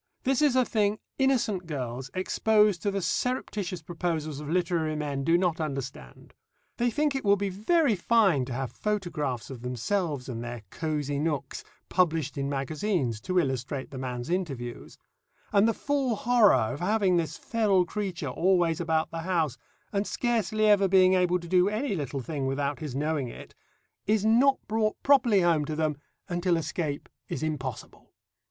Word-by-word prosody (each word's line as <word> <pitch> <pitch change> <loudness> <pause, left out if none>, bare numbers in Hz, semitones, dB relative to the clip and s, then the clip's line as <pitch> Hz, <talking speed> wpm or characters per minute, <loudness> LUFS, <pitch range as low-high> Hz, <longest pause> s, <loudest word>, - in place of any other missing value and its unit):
This 265 +1 +1
is 290 -4 +4
a 255 -1 +4
thing 210 -2 +1 0.2
innocent 235 -9 +1
girls 130 -3 -4
exposed 210 0 +2
to 205 - 0
the 195 -2 -2
surreptitious 200 -9 -2
proposals 160 -3 -3
of 150 -1 -7
literary 165 -2 0
men 145 -2 -3
do 165 +4 +4
not 175 -3 0
understand. 135 - -6 0.4
They 240 +1 +2
think 295 +4 0
it 270 - -3
will 200 -1 +5
be 200 0 -2
very 230 - +2
fine 190 - +3
to 125 - -6
have 130 0 -3
photographs 155 - -3
of 125 -3 -8
themselves 130 - -2
and 120 -3 -5
their 120 -2 -6
"cosy 150 -3 -2
nooks" 150 -3 -2 0.2
published 165 -5 +1
in 140 -1 -2
magazines, 140 - -1
to 185 +10 -2
illustrate 135 -3 -1
the 135 - -6
man's 125 +3 -4
interviews, 135 -10 -4 0.6
and 205 +1 +5
the - - +4
full 275 -1 0
horror 230 0 +5 0.2
of 145 - -6
having 195 -1 +2
this 160 -3 -2
feral 205 -5 +2
creature 180 -6 -4
always 175 +2 +2
about 160 -1 0
the 165 - -4
house, 165 -7 0 0.4
and 200 0 0
scarcely 220 -3 0
ever 205 -2 +5
being 185 0 +5
able 180 -1 +3
to 170 - -10
do 180 +2 +4
any 220 +4 -1
little 145 -5 -3
thing 140 0 -3
without 140 +1 -1
his 150 -5 -5
knowing 150 -1 -1
it, 120 - -10 0.5
is 215 0 +2
not 255 +5 +5
brought 215 0 0
properly 245 -8 +5
home 170 -3 +3
to 155 - -4
them 155 -1 0 0.3
until 175 -1 +1
escape 155 -2 -3 0.2
is - - -3
impossible. 135 -6 -5
175 Hz, 165 wpm, -27 LUFS, 145-205 Hz, 0.6 s, will